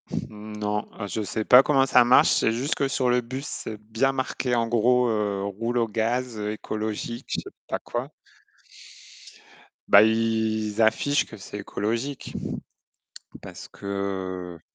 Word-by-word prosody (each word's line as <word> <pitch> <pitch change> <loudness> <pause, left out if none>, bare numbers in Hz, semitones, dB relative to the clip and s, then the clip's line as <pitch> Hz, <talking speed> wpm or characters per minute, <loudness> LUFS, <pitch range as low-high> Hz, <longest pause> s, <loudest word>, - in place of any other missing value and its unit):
Mmh, 105 0 -6
non. 105 0 -2
Heu, 100 - -4
je 100 +3 -3
sais 110 +2 -3
pas 125 +1 +8
comment 135 -1 +3
ça 125 -2 +6
marche. 120 +1 +5
Je - - +4
sais - - +4
juste 130 +6 -1
que 140 - 0
sur 130 -2 0
le 125 0 +3
bus, 130 +4 -6
c'est 110 - -6
bien 115 +5 0
marqué 130 -1 -1
en 115 -1 +1
gros, 120 +2 +3
heu: 105 -3 -1
«Roule 115 +5 -2
au 115 -1 +2
gaz 115 +2 -1
écologique», 110 +3 -4
je - - -1
sais - - -10 0.2
pas - - -2
quoi. - - -5 1.8
Bah 100 +1 +8
ils 110 -1 +1
affichent 130 +6 +3
que 110 - -11
c'est 100 +1 -8
écologique 115 +7 -3 1.1
parce - - -10
que 95 -3 -5
110 Hz, 155 wpm, -25 LUFS, 105-125 Hz, 1.8 s, pas